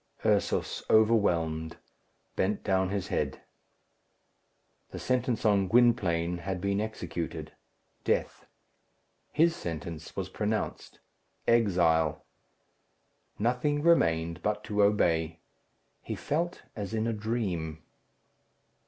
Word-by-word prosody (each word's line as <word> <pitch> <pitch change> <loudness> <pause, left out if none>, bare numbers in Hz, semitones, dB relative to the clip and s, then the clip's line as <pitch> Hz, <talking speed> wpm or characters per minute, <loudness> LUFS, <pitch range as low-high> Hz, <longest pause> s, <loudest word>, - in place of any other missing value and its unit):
Ursus, - - +1
overwhelmed, 85 -8 +2 0.6
bent 100 +2 0
down 95 -2 +1
his 100 -1 -3
head. - - -2 1.5
The - - -8
sentence 125 -2 0
on 100 -3 +4
Gwynplaine 90 -7 +3
had 95 +1 -3
been 100 +2 0
executed 110 0 -5 0.5
death. - - -1 0.8
His 165 +2 +3
sentence 80 - -6
was - - -3
pronounced 110 0 -3 0.5
exile. 85 -9 +3 1.1
Nothing 125 +6 0
remained 85 - +3
but 105 +2 -1
to 105 0 0
obey. 85 -5 +2 0.6
He - - -5
felt 170 +4 -2
as 105 0 -4
in 110 0 0
a 115 - 0
dream. 95 -8 -3
100 Hz, 95 wpm, -29 LUFS, 85-115 Hz, 1.5 s, on